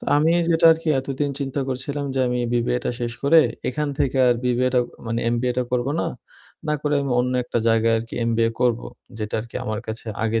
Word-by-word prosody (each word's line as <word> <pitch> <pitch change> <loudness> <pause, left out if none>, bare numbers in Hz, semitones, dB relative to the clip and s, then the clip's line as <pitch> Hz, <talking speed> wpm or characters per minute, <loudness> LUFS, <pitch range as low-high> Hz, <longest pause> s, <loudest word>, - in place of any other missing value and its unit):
তো - - -9
আমি 155 +3 +3 0.2
যেটা 165 0 +5
আরকি 160 0 -4
এতদিন 140 +2 -2
চিন্তা 140 0 -2
করছিলাম 140 +3 -3
যে 130 - +1
আমি 125 - -1
BBA 120 +1 +1
টা - - 0
শেষ 120 -1 -2
করে 160 +3 +7 0.3
এখান 150 +3 -1
থেকে 135 -1 +1
আর 120 - +4
BBA 125 +1 +2
টা 125 - +5 0.3
মানে 115 +1 -1
MBA 125 +1 0
টা - - +2
করব 125 0 +1
না। - - 0 0.6
না 150 - +2
করে 150 0 +1
আমি 135 -2 -1
অন্য 125 +1 -1
একটা 120 - -1
জায়গায় 115 0 +3
আরকি 115 +1 -7 0.2
MBA 115 0 +2
করব, 120 -2 +2 0.4
যেটা 105 -1 -4
আরকি 115 +1 -8
আমার 110 -1 -2
কাছে 110 +1 -6 0.2
আগে 115 0 +1
125 Hz, 215 wpm, -23 LUFS, 115-140 Hz, 0.6 s, করে